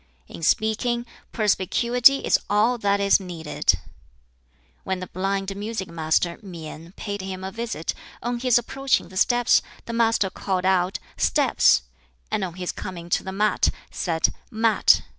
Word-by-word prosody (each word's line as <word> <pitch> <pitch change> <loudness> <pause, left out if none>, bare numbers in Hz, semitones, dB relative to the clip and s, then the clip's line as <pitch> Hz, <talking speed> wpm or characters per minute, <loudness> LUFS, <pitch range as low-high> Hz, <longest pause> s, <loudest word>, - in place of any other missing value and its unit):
"In - - -10
speaking, 225 +7 +1 0.3
perspicuity 235 +6 +3
is - - +4
all 220 +4 +3
that 200 -1 +2
is 200 0 +4
needed." 170 -5 0 1.1
When 190 -1 -2
the 185 - -5
blind 195 +2 -2
music 205 -2 -4
master 165 +1 0
Mien 165 -3 -9
paid 205 -1 -5
him 190 0 -6
a 190 - -4
visit, 220 -7 -3 0.3
on 240 0 -2
his 250 -1 +4
approaching 265 -4 0
the 185 - -13
steps 240 +3 +4 0.2
the 230 - -5
Master 225 -4 +2
called 185 -2 -2
out 185 0 +2 0.2
"Steps," 60 - +3 0.5
and 200 - 0
on 175 -3 -4
his 180 -1 -3
coming 175 -2 -8
to - - +2
the 190 - -5
mat, 210 +2 +2 0.2
said 165 -3 +1 0.2
"Mat." 225 0 +3
195 Hz, 145 wpm, -24 LUFS, 180-230 Hz, 1.1 s, is